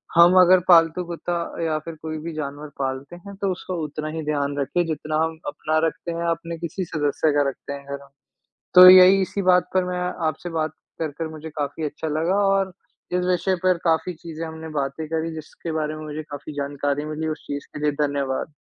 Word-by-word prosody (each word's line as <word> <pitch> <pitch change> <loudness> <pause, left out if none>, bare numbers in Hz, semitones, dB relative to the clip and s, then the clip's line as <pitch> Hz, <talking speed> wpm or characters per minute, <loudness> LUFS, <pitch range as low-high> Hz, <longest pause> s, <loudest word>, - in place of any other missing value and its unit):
हम 170 +2 +8
अगर 185 0 +7
पालतू 165 0 +5
कुत्ता 175 0 -4 0.3
या 160 -1 0
फिर 160 +1 -8
कोई 155 0 -4
भी 170 0 -5
जानवर 145 0 -5
पालते 135 +4 -3
हैं, 200 +3 -11
तो 195 -1 -1
उसका 185 0 -5
उतना 155 +1 -5
ही 160 - -3
ध्यान 145 -1 -1
रखें 175 +5 0
जितना 155 -1 -3
हम 160 0 -2
अपना 155 +2 -1
रखते 170 +1 -5
हैं, 170 0 -3
अपने 165 0 -3
किसी 170 +3 -4
सदस्य 150 -1 0
का 145 -1 +2
रखते 135 - -8
हैं 140 0 -9
घर 140 0 -4
में। 140 - -19 0.7
तो 180 0 +11
यही 185 +1 +8
इसी 190 +2 -2
बात 180 -1 +4
पर 185 -1 +3
मैं 180 0 -3 0.3
आपसे 160 +3 -3
बात 160 -2 -1 0.3
कर 160 -2 -2
कर 165 -1 -2
मुझे 155 0 -8
काफ़ी 150 +1 -4
अच्छा 150 +2 -4
लगा 160 +5 0
और 195 -1 +2 0.4
इस 180 0 +1
विषय 185 +1 +1
पर 185 -1 +3
काफ़ी 165 +2 +1
चीज़ें 165 0 -7
हमने 160 0 -8
बातें 140 +3 -3
करी 160 0 -2
जिसके 160 +1 -7
बारे 155 -1 -2
में 155 - -7
मुझे 155 0 -5
काफ़ी 145 0 -8
जानकारी 145 0 -2
मिली, 155 +1 -3
उस 155 -1 -5
चीज़ 145 0 -5
के - - -6
लिए 150 -1 +2
धन्यवाद। 140 +1 -2
160 Hz, 210 wpm, -23 LUFS, 150-175 Hz, 0.7 s, तो